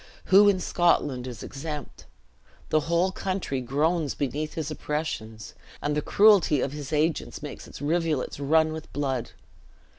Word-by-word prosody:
Who 205 +1 +8
in 195 -2 +2
Scotland 145 -8 +1
is 120 -2 -7
exempt? 150 +1 -7 0.6
The 155 - +3
whole 170 +3 +2
country 185 -9 -3
groans 150 +5 0
beneath 145 +3 -3
his 160 -1 -3
oppressions, 135 -8 -4 0.3
and 145 0 -1
the 150 - +1
cruelty 200 -6 +5
of 130 - -1
his 145 0 -7
agents 155 +1 -1
makes - - -8
its - - -10
rivulets 155 -3 0
run 155 +2 +3
with 160 0 -8
blood. 135 -4 -2
150 Hz, 145 wpm, -26 LUFS, 140-165 Hz, 0.6 s, Who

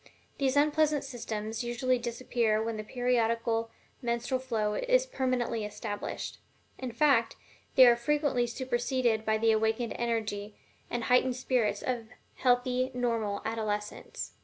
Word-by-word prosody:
These 270 -1 +1
unpleasant 300 0 +3
symptoms 225 -3 -4
usually 240 +1 0
disappear 235 -2 0
when 225 0 -2
the 215 - -4
periodical 230 -1 0 0.3
menstrual 240 +1 -1
flow 225 -5 -1
is - - +2
permanently 255 - -1
established. 210 0 -5 0.4
In 255 -2 -4
fact, 230 -2 +3 0.4
they 260 - +9
are 240 -1 +7
frequently 265 -1 +1
superseded 240 -2 0
by 220 0 +2
the 225 +1 +3
awakened 220 +1 +1
energy 215 -3 -2 0.3
and 240 -1 -2
heightened 250 +1 +3
spirits 240 -5 0
of 240 -3 -2 0.3
healthy, 250 0 +2
normal 230 -5 -1
adolescence. 210 -2 -3
240 Hz, 125 wpm, -30 LUFS, 220-255 Hz, 0.4 s, they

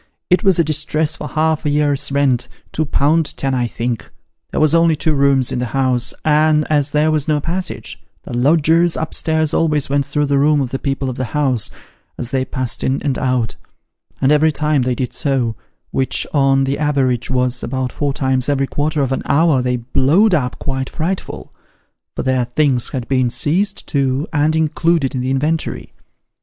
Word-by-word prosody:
It 180 - +4
was 190 -4 +4
a 170 - +4
distress 155 0 0
for 150 - -6
half 155 0 0
a 150 - 0
year's 145 -1 +1
rent 130 -3 +1 0.2
two 155 - -1
pound 150 +2 +1
ten 135 -1 -1
I 125 -2 0
think. 115 0 -4 0.4
There - - -2
was 155 0 +4
only 165 -1 +4
two 155 +1 +1
rooms 140 -3 +2
in - - -2
the 125 - -2
house, 130 -2 +2
and 155 0 +3
as 145 -1 +2
there 150 +2 +2
was 155 -1 0
no 150 -1 +2
passage, 175 +3 -5 0.2
the - - -8
lodgers 160 +6 +3
up 160 - -4
stairs 160 -1 0
always 150 -4 +1
went 140 0 +2
through 145 +1 -1
the 140 -1 +1
room 150 +1 +3
of 130 -3 -2
the 135 - -3
people 135 -1 -2
of 130 - -4
the 130 0 -4
house, 130 -7 +1 0.5
as 120 +1 -6
they 130 -1 0
passed 130 -2 -3
in 130 +1 0
and 140 -3 -1
out; 125 -4 0 0.7
and 135 +1 +2
every 155 +1 +4
time 150 -1 0
they 125 0 0
did 125 0 -3
so 130 -7 -1 0.4
which, 130 - 0
on 135 -2 +3
the 135 +2 -1
average, 135 -5 0
was 125 -1 0
about 130 0 -3
four 145 -1 -2
times 130 -1 -1
every 135 -1 +1
quarter 145 +2 -1
of 135 - -2
an 135 - -1
hour 150 -3 +3
they 125 0 0
blowed 135 - +2
up 125 -7 0
quite 135 -1 -3
frightful: 180 +4 -4 0.6
for - - -3
their 130 -2 +1
things 130 -1 +1
had 125 -3 -5
been 130 -2 +1
seized 190 - 0
too, 135 0 0
and 155 +1 +2
included 160 -2 +1
in 130 - -2
tho 125 - -3
inventory. 150 +5 -2
140 Hz, 195 wpm, -18 LUFS, 130-155 Hz, 0.7 s, It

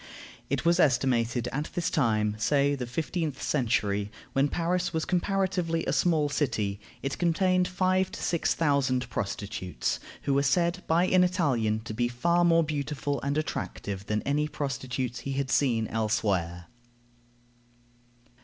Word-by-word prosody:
It - - -1
was 170 +1 +4
estimated 125 -5 +2
that 120 - -5
at 150 +2 -2
this 175 - 0
time, 110 -6 +1
say 140 +5 +2
the 130 -3 -3
fifteenth 160 +1 -3
century, 105 -6 0 0.2
when 135 +1 +3
Paris 175 +3 -1
was 160 0 -1
comparatively 180 -3 0
a 135 - 0
small 155 -3 +2
city, 110 -9 -1 0.2
it 135 0 -3
contained 180 +1 +2
five 185 +1 +1
to - - -6
six 170 - +1
thousand 140 -5 +1
prostitutes, 95 - -3 0.2
who 140 - +1
were 140 - +3
said 170 +6 +1
by 170 +2 +3
an 185 0 +4
Italian 130 - +1
to 110 -1 -7
be 120 +2 +1
far 170 +9 +1
more 165 -1 +5
beautiful 145 -1 -2
and 140 +1 -1
attractive 100 -9 -4
than 105 0 -1
any 150 +2 +1
prostitutes 130 -4 -3
he 135 - -4
had 135 -1 -2
seen 120 -6 +2
elsewhere. 100 -6 -1
140 Hz, 145 wpm, -28 LUFS, 115-170 Hz, 0.2 s, more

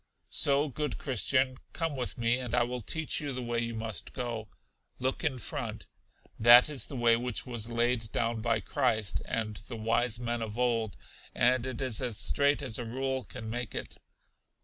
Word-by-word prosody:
So, 145 +1 +4
good 150 +2 -3
Christian, 130 0 +2 0.2
come 165 -3 -2
with 125 -2 -3
me, 120 +1 +2
and 125 -2 -2
I 120 - +4
will 125 +1 -3
teach 160 +9 +1
you 145 -2 -3
the 125 0 -4
way 120 0 -1
you 115 -1 -2
must 110 -2 -5
go. 115 -4 -4 0.5
Look 130 +5 -2
in 145 -5 0
front. 120 - -5 0.5
That 120 +4 +8
is 140 - -1
the 140 - -7
way 120 -2 +4
which 120 -1 -1
was 120 -3 -2
laid 120 -1 0
down 115 -1 -1
by 115 -1 +1
Christ 105 +1 0
and 110 -3 -2
the 110 +4 -8
wise 115 +1 +1
men 120 -1 -2
of 110 0 -5
old, 115 -4 0 0.4
and 125 +1 +3
it 130 -2 -4
is 125 -3 -2
as 120 -5 0
straight 140 +7 +3
as 120 -4 -2
a - - -2
rule 130 +2 -2
can 110 +3 -8
make 120 0 -4
it. - - -5
120 Hz, 190 wpm, -30 LUFS, 115-130 Hz, 0.5 s, That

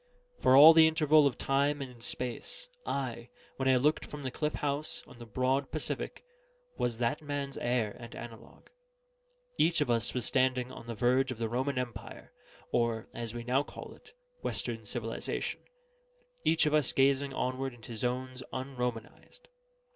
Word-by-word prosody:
For 130 - +6
all 150 +4 +11
the 160 0 +8
interval 155 -2 +5
of 135 - -2
time 140 +2 +1
and 125 -4 -8
space, 125 - -5 0.2
I, 125 -3 -3 0.3
when 135 - -1
I 130 - +6
looked 150 +5 +2
from 150 -1 -8
the 130 - -3
cliff 150 +3 -2
house 145 +1 -2
on - - -15
the 120 - -9
broad 130 +5 0
Pacific, - - -4 0.5
was 120 -2 -1
that 120 +6 0
man's 145 -2 -4
heir 120 -4 0
and 115 - -9
analogue: 115 -1 -11 0.9
each 170 -1 +4
of 145 -5 +1
us 115 -3 +1
standing 130 -1 +1
on 115 - -10
the 115 - -4
verge 130 +4 +2
of 125 - -5
the 115 -1 -2
Roman 130 +3 -1
Empire 125 -2 -6 0.4
(or, 115 -2 0
as 115 -1 -5
we 120 - -4
now 125 +3 +2
call 145 - -9
it, - - -18 0.3
Western - - -3
civilization), - - -3 0.8
each 165 -1 +3
of 150 - +1
us 150 -4 +3
gazing 140 +1 +3
onward 130 +1 -1
into 115 -1 -10
zones 125 +3 -2
unromanised. 130 - -5
130 Hz, 160 wpm, -31 LUFS, 120-140 Hz, 0.9 s, all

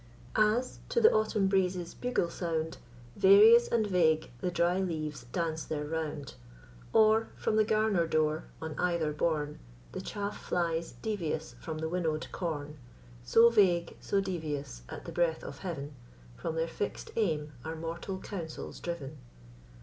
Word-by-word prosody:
As, 215 +4 +2
to - - +2
the 450 -1 +7
Autumn 215 -2 +2
breeze's 185 -3 0
bugle 245 -9 -1
sound, 160 -2 -2 0.4
Various 210 +4 +8
and 230 -2 +2
vague 160 -7 +2
the 180 - 0
dry 175 +1 +2
leaves 155 -8 -3
dance 160 +5 -2
their 150 -1 -3
round; 150 -3 -4 0.6
Or, 220 +1 +4
from - - 0
the 215 - +5
garner 215 -5 +2
door, 155 0 +1
on 160 0 -5
ether 170 -4 +1
borne, 150 -1 -1 0.3
The - - -5
chaff 205 0 -5
flies 170 -3 -1
devious 165 -7 -2
from 160 -1 -5
the 160 +1 -2
winnow'd 160 -2 -2
corn; 150 -4 -4 0.4
So 230 - +6
vague, 180 -6 +3
so 200 - 0
devious, 155 - -4
at - - -8
the - - -6
breath 170 -2 +1
of - - -8
heaven, 150 -6 -5 0.4
From 160 - -4
their 165 0 0
fix'd 200 +4 -4
aim 155 -9 0
are 160 +3 -4
mortal 165 +4 -5
counsels 170 -7 -6
driv'n. 155 -4 -5
170 Hz, 150 wpm, -31 LUFS, 155-200 Hz, 0.6 s, Various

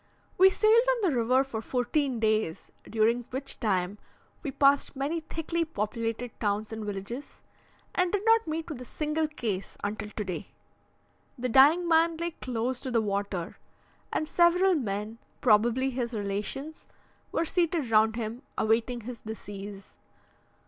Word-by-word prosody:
We 380 +1 +7
sailed 435 +4 +5
on 475 - -5
the - - -1
river 250 +3 +3
for 235 -5 -5
fourteen 255 +2 0
days, 215 -6 0 0.2
during 230 +2 +2
which 270 +2 -4
time 195 -2 0 0.4
we 295 - -3
passed 275 +1 +3
many 285 +5 -1
thickly 325 +1 -2
populated 230 -3 -3
towns 210 +1 -1
and 220 0 -5
villages, 210 +6 -6 0.5
and 365 -1 +1
did 410 +1 -1
not 450 -3 +4
meet 315 +1 -3
with 295 -7 -6
a - - -5
single 305 +3 -1
case 220 -11 -4
until 210 +1 -3
today. 195 -5 -4 0.9
The 250 +1 -2
dying 295 +8 +6
man 330 0 +4
lay 340 +1 -2
close 250 -3 -3
to 260 - -5
the 240 -2 +2
water, 200 -4 -2 0.5
and 310 - -1
several 355 +3 +4
men, 215 - -3 0.2
probably 240 +4 +3
his 240 -2 -3
relations, 210 +9 -4 0.4
were 335 - 0
seated 330 -7 0
round 220 0 +4
him, 230 +1 -4 0.2
awaiting 230 +2 +1
his 235 +1 -8
decease. 205 -2 -8
245 Hz, 145 wpm, -28 LUFS, 215-310 Hz, 0.9 s, We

